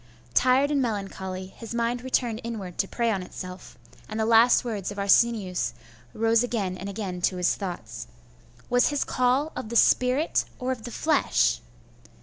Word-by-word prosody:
Tired 260 +3 +4
and 285 -2 +2
melancholy, 195 -5 -3
his 225 +5 -9
mind 235 +1 0
returned 245 -3 -1
inward 205 -7 -6
to 195 - +1
prey 235 +1 0
on 195 -3 -1
itself, 180 0 -9 0.3
and 215 0 -4
the 220 - +1
last 230 +2 +5
words 210 -5 -3
of 205 - -8
Arsenius 200 - +2 0.4
rose 225 0 +3
again 215 -7 -1
and 195 +2 -6
again 195 -3 -5
to 180 +1 +1
his 180 -1 +2
thoughts. 180 - -6 0.6
'Was 245 +1 +3
his 290 -1 0
call 255 +5 +1
of 215 - -5
the 235 - -5
spirit 255 +6 +3
or 255 +1 -2
of 250 -3 -5
the 240 - -6
flesh? 295 - +2
225 Hz, 165 wpm, -26 LUFS, 190-245 Hz, 0.6 s, last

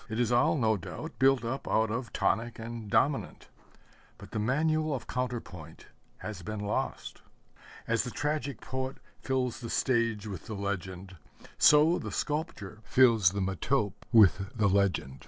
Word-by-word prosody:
It 110 +1 -3
is 120 -1 +1
all, 140 +6 +3
no 110 -4 +2
doubt, 90 - -8
built 135 -2 +4
up 130 +4 -4
out 110 -1 +2
of 120 +2 -4
tonic 115 +3 0
and 115 -1 -7
dominant 140 +6 0 0.7
but - - -13
the - - -2
manual 155 +6 +1
of 125 - -6
counter 125 -1 -2
point 80 -6 -12 0.3
has 105 -4 -7
been 105 +4 -5
lost. 105 0 -3 0.7
As 115 0 +1
the - - -4
tragic 145 +1 -3
poet 130 +1 -4 0.2
fills 130 -2 -1
the 115 - -7
stage 115 -4 0
with 95 -6 -7
the 110 - -5
legend, 95 -1 -5 0.4
so 150 +4 +6
the - - -6
sculptor 130 - -3
fills 115 -6 +5
the 100 +2 -3
metope 100 +3 0 0.2
with 100 -4 +5
the 105 -2 +3
legend. 95 -9 +1
115 Hz, 155 wpm, -29 LUFS, 100-130 Hz, 0.7 s, so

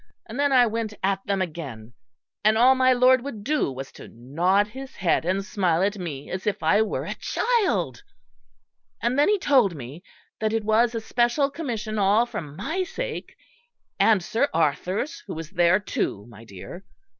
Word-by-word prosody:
And 225 +5 -8
then 285 0 +2
I 250 -2 +6
went 220 -1 -3
at 195 0 0
them 195 -1 +1
again; 135 -10 -8 0.5
and 215 +1 +4
all 250 +3 +6
my 260 0 +3
Lord 255 0 +4
would 230 -7 -7
do 295 - 0
was 135 +1 -7
to - - -12
nod 175 - 0
his 265 +4 -9
head 170 -3 +1
and 190 +2 0
smile 185 -4 +1
at 200 +1 -1
me 150 -6 -6
as 185 +2 -4
if 210 - -1
I 210 - +4
were 220 - -2
a - - -3
child; 465 -6 0 1.0
and 245 +4 0
then 290 - +4
he 420 - +3
told 260 - +3
me 140 +4 -9 0.4
that 220 0 0
it 225 -1 0
was 230 +2 +3
a 225 - -2
special 240 +5 +1
Commission 230 -8 -4
all 205 +4 +4
for 240 -3 -5
my 160 - -4
sake, 460 +6 -5 0.6
and 215 -5 +4
Sir 230 +10 0
Arthur's, 185 - 0
who 190 - -5
was 165 +1 -7
there 175 0 +3
too, 105 - -3
my 115 -1 -14
dear.... 110 - -10
210 Hz, 180 wpm, -24 LUFS, 175-250 Hz, 1.0 s, I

